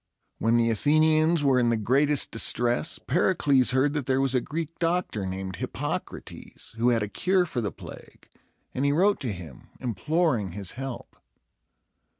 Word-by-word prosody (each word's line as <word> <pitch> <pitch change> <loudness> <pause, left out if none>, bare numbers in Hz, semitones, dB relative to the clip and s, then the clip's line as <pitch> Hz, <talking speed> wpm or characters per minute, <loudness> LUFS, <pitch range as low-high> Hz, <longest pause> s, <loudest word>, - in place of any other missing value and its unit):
When 115 +1 +2
the 115 0 +2
Athenians 155 +5 +3
were 135 -2 +3
in 120 -1 +2
the 115 - +1
greatest 140 +6 +2
distress, 120 +5 +1
Pericles 145 -5 +2
heard 130 +3 +2
that 145 -4 -3
there 130 0 +2
was 135 -1 +1
a 125 - +2
Greek 160 +2 -5
doctor, 165 - -1
named 95 0 -5
Hip - - -5
poc´ra - - -4
tes, - - -11
who 115 +2 +2
had 115 -3 +1
a - - -3
cure 185 - +1
for 125 -7 -3
the 105 -4 -2
plague; - - -13 0.5
and 130 - -2
he 140 - +3
wrote 195 +7 +2
to 125 -5 -3
him, 85 -9 -10
imploring 125 - -1
his 100 -1 -4
help. 135 -1 -7
130 Hz, 170 wpm, -26 LUFS, 115-155 Hz, 0.5 s, Athenians